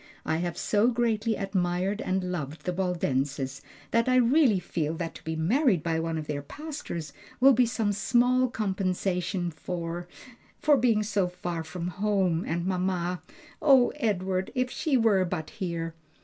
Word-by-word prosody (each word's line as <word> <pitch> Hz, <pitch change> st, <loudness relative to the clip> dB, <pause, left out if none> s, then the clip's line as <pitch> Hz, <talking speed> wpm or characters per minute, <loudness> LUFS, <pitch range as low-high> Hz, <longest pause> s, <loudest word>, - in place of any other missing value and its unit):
I 160 Hz, -, +1 dB
have 175 Hz, 0 st, -3 dB
so 210 Hz, +2 st, +2 dB
greatly 230 Hz, -2 st, +1 dB
admired 190 Hz, +1 st, -1 dB
and 185 Hz, 0 st, -1 dB
loved 155 Hz, -3 st, -5 dB
the 180 Hz, -, -1 dB
Waldenses 140 Hz, -7 st, -1 dB, 0.3 s
that 230 Hz, +2 st, +2 dB
I 255 Hz, -, +4 dB
really 250 Hz, -3 st, +4 dB
feel 160 Hz, -3 st, -2 dB
that 165 Hz, 0 st, -4 dB
to -, -, -12 dB
be 160 Hz, 0 st, -3 dB
married 195 Hz, -, +2 dB
by 165 Hz, -1 st, 0 dB
one 165 Hz, 0 st, -2 dB
of 155 Hz, -, -4 dB
their 150 Hz, -1 st, -3 dB
pastors 170 Hz, -, -6 dB, 0.3 s
will 270 Hz, +2 st, +7 dB
be 250 Hz, 0 st, +4 dB
some 225 Hz, -3 st, 0 dB
small 245 Hz, +5 st, +3 dB
compensation 185 Hz, -4 st, -1 dB
for 170 Hz, +1 st, -5 dB, 0.5 s
for 295 Hz, -1 st, +5 dB
being 230 Hz, -4 st, +3 dB
so 205 Hz, -3 st, +1 dB
far 175 Hz, -2 st, -4 dB
from 170 Hz, +2 st, -5 dB
home 185 Hz, -2 st, +1 dB
and 170 Hz, +2 st, -1 dB
mamma. 180 Hz, -1 st, -1 dB, 0.4 s
O 270 Hz, -5 st, +6 dB
Edward, 190 Hz, -3 st, 0 dB
if 255 Hz, 0 st, 0 dB
she 290 Hz, -4 st, +1 dB
were 215 Hz, -5 st, +4 dB
but 175 Hz, -3 st, -4 dB
here!" 170 Hz, -5 st, -4 dB
185 Hz, 160 wpm, -28 LUFS, 170-225 Hz, 0.5 s, will